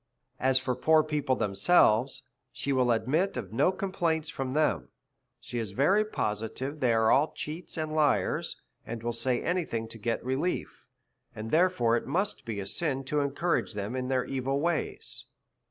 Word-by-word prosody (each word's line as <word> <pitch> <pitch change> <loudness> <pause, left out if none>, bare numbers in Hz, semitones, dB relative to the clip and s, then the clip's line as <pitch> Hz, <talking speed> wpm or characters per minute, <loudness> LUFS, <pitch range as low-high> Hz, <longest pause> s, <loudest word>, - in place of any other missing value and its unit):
As 130 0 +3
for 130 -1 0
poor 155 +4 +4
people 150 -4 0
themselves, 125 - +3 0.3
she 140 +3 -2
will 130 -2 +2
admit 130 - +1
of 110 -4 -5
no 140 +10 +3
complaints 175 -5 -1
for 135 -5 -4
them; 155 +3 +1 0.5
she 120 0 -5
is 110 -4 -4
very 190 +10 +4
positive 130 - -3
they 125 -3 +3
are 110 -1 +3
all 145 +4 +3
cheats 160 +3 -6
and 155 -1 -2
liars, 150 -2 +1 0.2
and 115 0 -6
will 120 0 -1
say 120 +1 0
any 180 +1 +1
thing 115 -6 -4
to 115 - -6
get 115 +2 -2
relief, 135 +8 -2 0.5
and 110 +1 -6
therefore 155 -9 +3
it - - -5
must 195 +4 -1
be 110 -3 -4
a 100 - -4
sin 135 - -1
to 150 +3 -1
encourage 145 +1 0
them 105 +4 -3
in 130 0 -2
their 130 -1 +1
evil 135 +1 -1
ways. 165 +1 -1
130 Hz, 170 wpm, -29 LUFS, 115-155 Hz, 0.5 s, poor